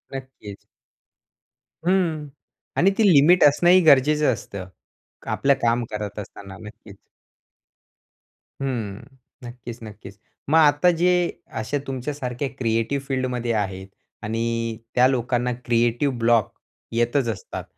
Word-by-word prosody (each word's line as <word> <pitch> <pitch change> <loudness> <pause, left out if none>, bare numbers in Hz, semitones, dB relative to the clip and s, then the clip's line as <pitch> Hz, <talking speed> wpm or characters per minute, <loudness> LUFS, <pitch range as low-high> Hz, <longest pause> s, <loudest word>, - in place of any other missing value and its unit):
नक्कीच. 130 -7 -9 1.3
हं 165 -6 +1 0.5
आणि 195 +3 +4
ती 225 - +3
लिमिट 160 +6 +6
असणं 150 +4 +5
ही 185 +1 +7
गरजेचं 150 -2 +4
असतं. 100 -4 -8 0.6
आपलं 140 0 +3
काम 120 +1 +1
करत 105 -1 -5
असताना 100 -1 -10
नक्कीच. 105 -2 -13 1.7
हं, 115 -7 -3 0.4
नक्कीच, 120 -1 -9
नक्कीच. 105 -2 -11 0.3
मग 160 - +4
आता 150 +3 +5
जे 180 - +4 0.5
अशा 130 +7 -2
तुमच्या 135 +2 -4
सारख्या 125 -1 -4
क्रिएटिव्ह 115 +3 -1
फील्डमध्ये 125 -3 -2
आहेत 95 -3 -3 0.4
आणि 115 +1 -2 0.2
त्या 125 +1 +6
लोकांना 125 -1 0
क्रिएटिव्ह 120 +3 +1
ब्लॉक 115 -2 +2 0.4
येतच 120 +2 +1
असतात. 110 - -6
120 Hz, 110 wpm, -23 LUFS, 110-140 Hz, 1.7 s, ही